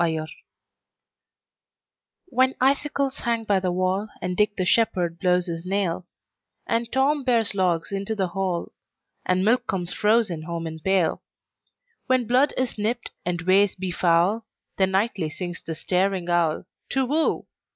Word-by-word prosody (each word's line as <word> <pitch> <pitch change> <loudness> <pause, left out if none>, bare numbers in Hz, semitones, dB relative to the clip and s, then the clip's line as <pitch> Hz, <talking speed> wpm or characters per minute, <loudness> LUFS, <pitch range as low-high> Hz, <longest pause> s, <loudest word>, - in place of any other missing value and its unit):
Winter 160 -2 0 2.0
WHEN 260 +1 +2
icicles 275 0 +1
hang 230 -1 -1
by 205 -3 +2
the 185 -1 -1
wallAnd 185 0 -2
Dick 210 +1 +2
the 185 - -1
shepherd 180 -6 +1
blows 180 -1 +2
his 165 -2 -5
nail, 185 -2 -1 0.6
And 230 0 -1
Tom 275 +2 +2
bears 235 -4 +2
logs 180 -2 0
into 200 +2 -2
the 190 -3 -1
hall, 185 -1 -2 0.6
And 185 +1 +2
milk 245 +3 +2
comes 175 -2 -2
frozen 210 -6 +2
home 165 +1 -4
in 160 0 -6
pail; 185 -1 +1 0.9
When 255 -2 +2
blood 255 +5 +3
is 255 -4 -2
nipt, 230 +3 -1 0.2
and 175 0 -1
ways 195 +2 +4
be 185 -1 -4
foul, 180 +6 +2 0.3
Then 190 -1 +3
nightly 190 -4 0
sings 175 +2 -6
the 160 - -5
staring 185 +1 0
owlTu 175 +9 -1
whoo! 310 +4 +1
190 Hz, 140 wpm, -24 LUFS, 175-230 Hz, 2.0 s, ways